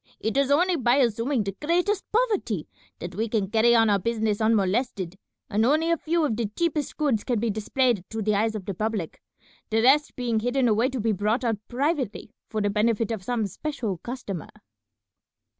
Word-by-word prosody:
It 220 - -2
is 275 -1 +2
only 350 +5 +3
by 245 -2 +3
assuming 240 -1 +1
the 195 -1 -4
greatest 355 +6 +1
poverty 420 - 0 0.3
that 175 +1 -7
we 220 +5 -2
can 210 -3 -1
carry 235 +1 +4
on 225 -1 +5
our 200 -1 +3
business 220 0 -1
unmolested, 210 -3 +1 0.3
and 210 +2 +1
only 310 +7 +3
a 335 - +3
few 330 0 0
of 240 -7 0
the 230 -1 -1
cheapest 320 -4 -1
goods 275 -9 +1
can 240 -4 0
be 230 0 0
displayed 220 0 0
to 220 -1 -3
the 215 +1 +1
eyes 220 +2 +1
of 200 -4 -5
the 200 - -3
public, 210 -3 -3 0.5
the 225 +1 +1
rest 290 +4 +4
being 240 -3 0
hidden 245 +3 +1
away 230 +3 +2
to 265 -2 -4
be 225 +1 +1
brought 210 +5 0
out 225 -4 0
privately 260 - -2 0.2
for 215 -1 -2
the 205 0 +1
benefit 220 +1 +1
of 220 -4 -3
some 230 +1 -1
special 220 - -4
customer." 220 - -6
230 Hz, 190 wpm, -25 LUFS, 210-270 Hz, 0.5 s, on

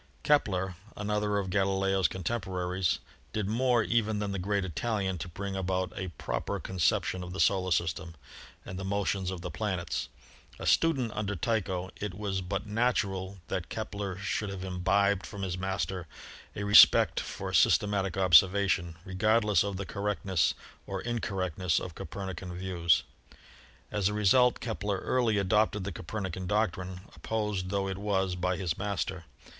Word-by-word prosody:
Kepler, 95 - +2 0.2
another 105 0 0
of 95 -2 -2
Galileo's 95 -1 +2
contemporaries, 95 -2 -1 0.4
did 105 -3 -1
more 120 +1 +2
even 110 -1 +1
than 105 -1 -2
the 100 - -2
great 100 +1 0
Italian 95 0 -2
to 85 - -4
bring 95 +3 -5
about 95 -1 -1
a 95 - -3
proper - - -3
con 95 -1 -7
ception 90 +2 +1
of 90 0 -7
the 95 - -5
solar 95 -2 +3
system 85 0 -1 0.5
and 90 - -6
the - - -4
motions 95 -1 -1
of 95 -2 -5
the - - -5
planets. 85 - -2 0.5
A - - -7
student 135 -9 +3
under 105 -1 -2
Tycho, 95 -3 -1
it 100 -3 -4
was 100 -2 -2
but 95 +3 -3
natural 100 -4 0
that 90 -3 -3
Kepler 100 -3 -4
should 100 +1 -2
have 95 -1 -6
imbibed 95 +2 +1
from 100 -1 -7
his 90 -2 -2
master 95 -1 -2 0.5
a 100 - -3
respect 100 0 +7
for - - -5
syste 105 - +4
matic 100 -2 -1
observation, 95 -1 +4
regardless 105 +2 +3
of 100 -2 -3
the 100 - -4
correctness 100 -3 0 0.3
or 95 -1 -4
incor 115 -4 -2
rectness 90 -1 0
of 90 - -6
Copernican 90 +1 -6
views. 90 -3 +2 0.9
As 105 -3 +1
a 105 - -3
result 120 +5 +4
Kepler 105 -4 -2
early 120 -4 +1
adopted 105 +1 +2
the 100 - -3
Copernican 95 +1 -5
doctrine, 95 -3 -1
opposed 105 -4 -2
tho 100 0 0
it 95 0 -4
was 95 -2 0
by 90 0 -1
his 90 -4 -2
master. 95 -3 -2
95 Hz, 155 wpm, -30 LUFS, 90-105 Hz, 0.9 s, respect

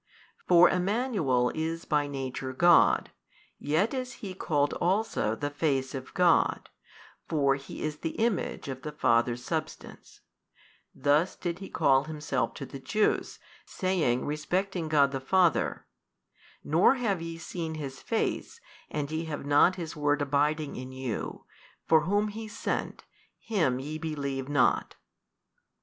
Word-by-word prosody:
For 180 0 +7
|224 - - +1
Emmanuel 180 - +1
is 165 +1 -3
by 150 -2 +1
Nature 135 -1 -4
God, 170 +5 +5 0.5
yet 160 - +1
is 255 -1 -3
He 195 -5 -7
called 145 -5 0
also 185 - +1
The 145 +4 -3
Face 140 -3 0
of 130 -2 -6
God: 180 -2 +3 0.6
for 140 -4 +3
He 135 0 -7
is 155 0 -3
the 160 - -4
Image 220 -10 -1
of 130 -1 -5
the 150 - -5
Father's 120 -2 +2
Substance: 155 -2 -6 0.7
thus 150 +5 +2
did 175 0 -4
He 195 - -8
call 135 0 +3
Himself 150 -4 -2
to 140 - -6
the 135 - -9
Jews, 210 +10 0 0.3
saying 175 - 0
respecting 175 +4 -2
God 145 -3 +4
the 135 - -2
Father, 175 +4 +2 0.8
Nor 170 - +4
have 210 -9 -1
ye 165 0 -5
seen 165 -1 -5
His 135 -4 -6
Face 235 - -2 0.3
and 150 -1 -3
ye 160 +1 -2
have 150 -3 -5
not 145 +6 +5
His 165 -3 -6
Word 145 -1 +1
abiding 145 +1 0
in 130 +1 -7
you, 130 -4 -5 0.4
for 160 -2 +4
Whom 205 +3 +1
He 220 +1 -7
sent, 210 - -3 0.3
Him 165 - 0
ye 150 +4 -5
believe 140 -4 -3
not. 140 -4 +2
155 Hz, 140 wpm, -28 LUFS, 140-180 Hz, 0.8 s, For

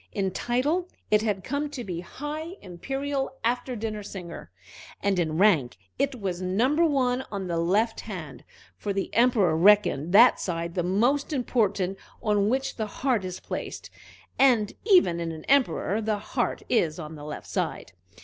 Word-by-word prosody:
In 195 -2 -1
title 285 - 0 0.2
it 210 0 +5
had 205 -4 -1
come 290 +5 -2
to 265 -4 -6
be 180 -5 -4
High 300 - -6
Imperial 270 +9 -3
After 245 +2 -1
Dinner 215 -1 -4
Singer, 180 - -8 0.5
and 195 -2 +1
in 160 -2 0
rank 165 - +3 0.2
it 275 -3 0
was 185 -3 -3
Number 240 - +2
One 260 -5 +1
on 200 -2 -3
the 170 -2 -1
left 210 +7 +1
hand; 155 - -8 0.3
for 205 - -3
the 195 0 -3
Emperor 230 -9 +3
reckoned 175 -4 +4
that 230 +6 +7
side 170 -1 -3
the 175 - 0
most 235 - +1
important 205 -8 0 0.2
on 210 -1 +1
which 265 +2 -1
the 220 -2 -2
heart 245 -1 0
is 185 -1 -5
placed, - - -6 0.5
and 240 -6 +4
even 355 - +5
in 165 -1 -3
an 160 -1 -9
Emperor 225 - +2
the 215 -1 0
heart 240 +4 -2
is 165 -10 +1
on 160 -2 -7
the 150 -2 -10
left 150 0 -7
side. - - -3
210 Hz, 165 wpm, -26 LUFS, 180-255 Hz, 0.5 s, that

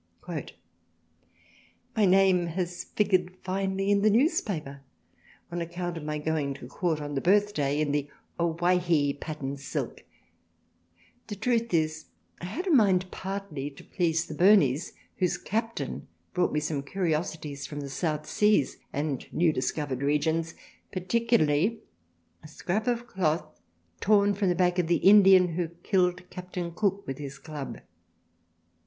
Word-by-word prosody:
" 85 - -29 1.7
My 215 - +4
Name 185 -2 +4
has 175 +1 -3
figured 185 -3 0
finely 195 +1 -1
in 200 0 +3
the 215 - +5
Newspaper 200 - 0 0.7
on 175 0 -3
account 175 +1 -4
of 165 - -6
my 150 0 -2
going 150 -2 -1
to 125 - -10
Court 160 +3 -1
on 145 -1 -5
the 135 - -1
Birthday 180 -7 +2
in 150 -2 +1
the 145 0 -1 0.3
O 170 -1 +1
Why 175 +2 +2
Hee 160 -5 +2
Pattern 140 -2 -5
Silk, 135 -1 -5 1.2
the 205 - -5
Truth 230 +2 0
is 155 -2 0 0.4
I - - -5
had 290 - -4
a 370 - 0
mind 190 - +4
partly 190 -8 -5
to 140 - -14
please 165 -2 0
the - - -7
Burneys, 175 -7 +4 0.2
whose 180 -2 +1
Captain 225 +2 -3 0.3
brought 180 - +1
me 150 - 0
some 150 -2 -2
Curiosities 155 -3 -2
from 145 -1 -6
the 140 - -5
South 155 +1 -2
Seas 210 -4 +2
and 145 -2 -3
new 165 -2 +2
discovered 135 -1 -2
Regions, 160 +3 0 0.4
particularly 200 -2 +1 0.6
a 155 - -12
Scrap 185 +8 -3
of 240 -1 0
Cloth 170 -9 0 0.5
torn 205 0 +4
from 200 -1 0
the 175 - +2
back 180 0 +2
of 175 - +1
the 170 - +3
Indian 190 -1 +7
who 170 +1 -2
killed 180 +1 0
Capt. 180 0 -9 0.2
Cook 200 +1 0
with 135 +1 -5
his 140 -1 -7
Club. 145 -1 -7
175 Hz, 150 wpm, -28 LUFS, 150-195 Hz, 1.7 s, Indian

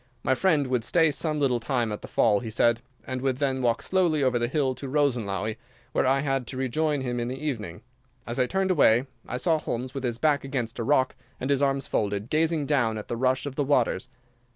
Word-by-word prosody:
My - - +3
friend 155 -1 +2
would 125 -3 0
stay 160 +4 +3
some 155 0 -1
little 130 -4 +2
time 120 -1 -1
at 105 - -5
the - - -8
fall, 105 -3 +3
he 115 - -6
said, 115 +1 +2 0.2
and 130 -1 -4
would 130 -1 0
then 135 -2 0
walk 120 -2 +1
slowly 175 -6 +2
over 125 -2 +2
the 120 - 0
hill 135 0 0
to 135 - -7
Rosenlaui, 110 -7 0 0.3
where 130 - +1
I 135 +2 +2
was 135 -1 +1
to 130 - -7
rejoin 145 +3 0
him 125 -2 -2
in 120 - -2
the 130 +2 -4
evening. 110 - -4 0.4
As 120 +3 -4
I 125 - +3
turned 190 +3 0
away 125 -7 +4 0.2
I 125 - -3
saw 160 +5 +2
Holmes, 125 -2 -4
with 135 -2 -5
his 120 -2 -1
back 150 +1 +2
against 125 -4 -3
a - - -1
rock 130 0 +2 0.2
and 130 +2 -2
his 140 -1 +2
arms 135 -1 +1
folded, 105 +1 -2
gazing 160 -1 +1
down 120 -7 +1
at 105 - -8
the - - -1
rush 130 +2 +1
of 145 - -4
the 145 - 0
waters. 125 -5 +1
130 Hz, 230 wpm, -26 LUFS, 120-145 Hz, 0.4 s, away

